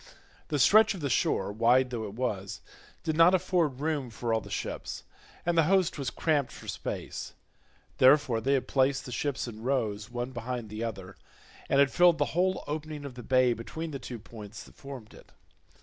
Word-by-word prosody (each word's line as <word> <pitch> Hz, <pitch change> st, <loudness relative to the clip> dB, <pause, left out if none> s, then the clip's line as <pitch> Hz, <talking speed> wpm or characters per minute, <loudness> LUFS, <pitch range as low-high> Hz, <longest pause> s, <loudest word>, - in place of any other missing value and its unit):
The 150 Hz, -, -1 dB
stretch 210 Hz, -, +6 dB
of 180 Hz, -, -8 dB
the 140 Hz, -2 st, -1 dB
shore, 95 Hz, -3 st, +1 dB
wide 120 Hz, +4 st, +3 dB
though 115 Hz, -3 st, -3 dB
it 100 Hz, 0 st, -8 dB
was, 105 Hz, -5 st, -3 dB, 0.4 s
did 160 Hz, -, -1 dB
not 165 Hz, +3 st, +6 dB
afford 175 Hz, -7 st, 0 dB
room 150 Hz, -5 st, -1 dB
for 115 Hz, +1 st, -2 dB
all 110 Hz, -, +1 dB
the -, -, -11 dB
ships, -, -, -5 dB, 0.4 s
and 175 Hz, 0 st, +1 dB
the 165 Hz, -2 st, +5 dB
host 190 Hz, -5 st, +2 dB
was 135 Hz, -3 st, -1 dB
cramped 145 Hz, -1 st, 0 dB
for -, -, -12 dB
space, -, -, -5 dB, 0.6 s
therefore 130 Hz, -3 st, +5 dB
they 135 Hz, +3 st, +1 dB
had 135 Hz, -, 0 dB
placed 135 Hz, 0 st, +1 dB
the 125 Hz, -, -7 dB
ships 140 Hz, +1 st, -2 dB
in 110 Hz, -2 st, -8 dB
rows 110 Hz, -5 st, -1 dB
one 120 Hz, +1 st, -4 dB
behind 120 Hz, -2 st, -5 dB
the 105 Hz, +2 st, -5 dB
other, 95 Hz, -4 st, -6 dB, 0.5 s
and 140 Hz, -, +3 dB
had 140 Hz, -1 st, +5 dB
filled 175 Hz, -2 st, +5 dB
the -, -, +2 dB
whole 185 Hz, +2 st, +1 dB
opening 150 Hz, -1 st, -5 dB
of 140 Hz, -, -7 dB
the 125 Hz, -, -9 dB
bay 130 Hz, 0 st, +3 dB
between 160 Hz, +8 st, -6 dB
the 140 Hz, -, -5 dB
two 125 Hz, -1 st, -7 dB
points 110 Hz, -1 st, -10 dB
that -, -, -16 dB
formed 135 Hz, -6 st, -10 dB
it. -, -, -16 dB
130 Hz, 195 wpm, -29 LUFS, 115-150 Hz, 0.6 s, stretch